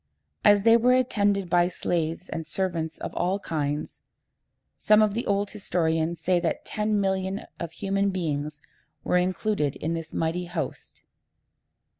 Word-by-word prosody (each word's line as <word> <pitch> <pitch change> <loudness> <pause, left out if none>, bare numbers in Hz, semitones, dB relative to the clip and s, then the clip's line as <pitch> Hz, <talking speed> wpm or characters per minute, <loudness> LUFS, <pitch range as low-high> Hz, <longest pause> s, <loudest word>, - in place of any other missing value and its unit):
As 205 -1 +6
they 230 +1 +7
were 250 +2 +4
attended 205 -6 +1
by 175 0 +3
slaves 170 0 -2
and 165 - -4
servants 165 -2 -2
of - - -6
all 185 +3 0
kinds, 150 -5 -3 0.7
some 215 0 +4
of 215 -2 +3
the 235 +3 -3
old 200 0 0
historians 165 -4 -1
say 175 +2 +2
that 170 -1 -2
ten 210 -1 0
millions 190 0 -1 0.2
of 170 -2 -4
human 195 +2 0
beings 150 -5 -3 0.4
were 180 - +2
included 180 -4 0
in 160 +2 -2
this 165 -1 -5
mighty 165 +2 -1
host. 170 -5 -6
180 Hz, 145 wpm, -26 LUFS, 165-200 Hz, 0.7 s, they